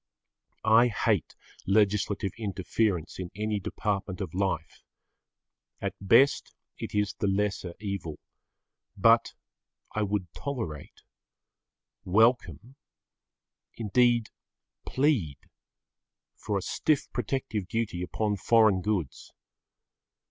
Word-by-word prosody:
I 115 +2 +6
hate 110 - 0 0.3
legislative 100 -1 +2
interference, 100 -4 -1
in 90 -2 -4
any 105 0 -1
department 100 -1 -3
of 95 -2 -5
life. 90 -4 -2 1.0
At - - -3
best 115 +8 +4 0.2
it - - -6
is 105 -1 +1
the 100 - -2
lesser 95 -3 -1
evil. 100 -7 -4 0.8
But - - +4 0.6
I 110 - -1
would 100 -3 -2
tolerate, 115 - -6 1.0
welcome, 110 - +2 1.0
indeed, 120 +1 +2 0.6
plead 130 - +1 1.0
for 105 - -2
a 95 - -3
stiff 155 -3 0
protective 125 -5 -2
duty 110 -5 -2
upon 105 +3 -1
foreign 110 -2 +4
goods. 95 -9 -3
105 Hz, 90 wpm, -28 LUFS, 95-115 Hz, 1.0 s, I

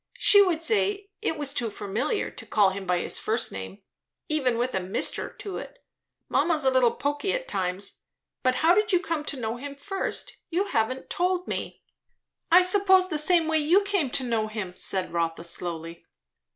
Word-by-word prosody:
She 405 - +7
would 345 -5 +1
say 405 0 0
it 320 - -1
was 290 -2 -2
too 235 -2 0
familiar, 215 - -2
to - - -8
call 205 -3 +4
him 190 0 -6
by 180 0 +2
his - - -2
first 225 +2 0
name, 95 - -8 0.5
even 265 -6 +1
with 245 +2 -1
a 190 - +1
'Mr.' 185 +1 -1
to 400 -2 -6
it. - - -9 0.5
Mamma's 305 0 +1
a 265 - +5
little 250 -3 +4
poky 290 +6 -1
at - - -3
times. 185 - -3 0.4
But 255 0 +2
how 340 - +7
did 420 +2 +2
you 360 - +4
come 330 -4 -2
to 280 - -3
know 225 0 -3
him 280 +2 -7
first? 390 - -4
you 355 +3 +1
haven't 255 - -2
told 360 0 0
me." - - -5 0.7
"I 360 +2 +8
suppose, 375 0 +4
the 310 -3 0
same 330 +1 +3
way 315 0 +2
you 340 +7 +4
came 395 -9 0
to 260 - -1
know 230 -3 0
him," 210 -4 -5
said 190 -1 -2
Rotha 165 -1 -1
slowly. 170 -1 -5
280 Hz, 190 wpm, -26 LUFS, -, 0.7 s, I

